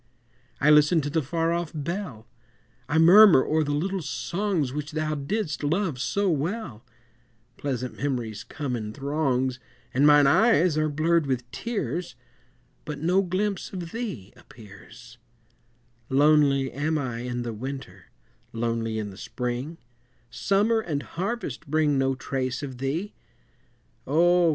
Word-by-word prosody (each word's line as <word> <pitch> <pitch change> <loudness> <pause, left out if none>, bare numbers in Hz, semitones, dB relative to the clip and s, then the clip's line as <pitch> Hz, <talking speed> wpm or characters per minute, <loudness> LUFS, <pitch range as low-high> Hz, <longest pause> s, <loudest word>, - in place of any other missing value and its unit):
I 150 - +4
listen 150 +3 +5
to 145 0 -4
the 160 - +1
far 165 +4 -1
off 170 -2 -2
bell, 155 - -5 0.6
I 160 - +1
murmur 175 -2 +8
o'er 155 +1 +1
the 145 - -2
little 185 +6 -1
songs 170 -6 -2
Which 150 +1 -5
thou 155 0 -1
didst 155 +2 -3
love 160 -2 0
so 200 +11 0
well, 160 - -2 0.7
Pleasant 130 -3 -4
memories 120 -7 -3
come 145 -4 -4
in 110 -2 -5
throngs 135 -3 -1 0.3
And 140 +4 +4
mine 145 -1 +7
eyes 180 +1 +4
are 155 0 +1
blurred 155 +1 +1
with 125 -2 -2
tears, 180 - -3 0.7
But 150 -1 -5
no 175 +6 +2
glimpse 195 +2 -2
of 175 -3 -6
thee 200 - -6
appears: 115 +2 -15 0.9
Lonely 140 -1 +4
am 155 +3 -1
I 125 -5 -3
in 120 0 -3
the 120 -1 -4
Winter, 110 -6 -7 0.5
lonely 115 -1 -2
in 105 -2 -4
the 95 - -13
Spring, 125 +8 -4 0.5
Summer 200 - +2
and 155 -9 -3
Harvest 190 - -4
bring 150 -1 +2
no 135 0 +1
trace 130 0 -3
of 130 -3 -7
thee 155 +10 -2 0.9
Oh! 175 +4 +4
145 Hz, 135 wpm, -26 LUFS, 130-170 Hz, 0.9 s, murmur